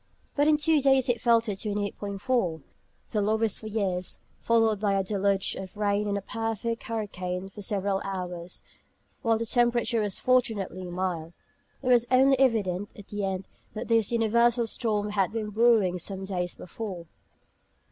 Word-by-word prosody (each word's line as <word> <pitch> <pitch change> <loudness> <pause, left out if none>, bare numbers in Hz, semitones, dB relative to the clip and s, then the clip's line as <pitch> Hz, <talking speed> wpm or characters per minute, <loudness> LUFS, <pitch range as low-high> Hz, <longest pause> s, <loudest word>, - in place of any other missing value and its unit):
But 290 0 +3
in 305 -1 +5
two 305 0 +3
days 270 -2 +4
it 240 -2 +1
fell 235 -1 +5
to 225 -2 -4
28·4 200 - -2 0.5
(the 210 - +1
lowest 220 +1 +2
for 220 - -7
years), 195 -4 -2 0.2
followed 225 -2 +2
by 205 -1 +1
a 195 0 +1
deluge 195 0 0
of 190 +1 -8
rain 205 0 +1
and 200 0 0
a 200 - -5
perfect 225 +1 -3
hurricane 190 -4 -4
for 205 - -10
several 195 -1 0
hours, 180 -2 -5 0.6
while 225 -1 +2
the 230 - -2
temperature 240 0 +2
was 205 -2 -2
fortunately 225 -8 +1
mild. 175 -2 -3 0.5
It - - -4
was 240 -1 +5
only 265 +1 +5
evident 205 -7 +1
at 205 - -12
the 205 -1 -3
end 190 -1 -2 0.3
that 215 - -5
this 225 -2 +3
universal 235 +1 +3
storm 210 -2 -1
had 195 -3 +1
been 215 -1 -3
"brewing" 215 -5 +3
some 190 +2 -3
days 180 -2 -3
before. 185 -2 -7
210 Hz, 160 wpm, -27 LUFS, 190-230 Hz, 0.6 s, in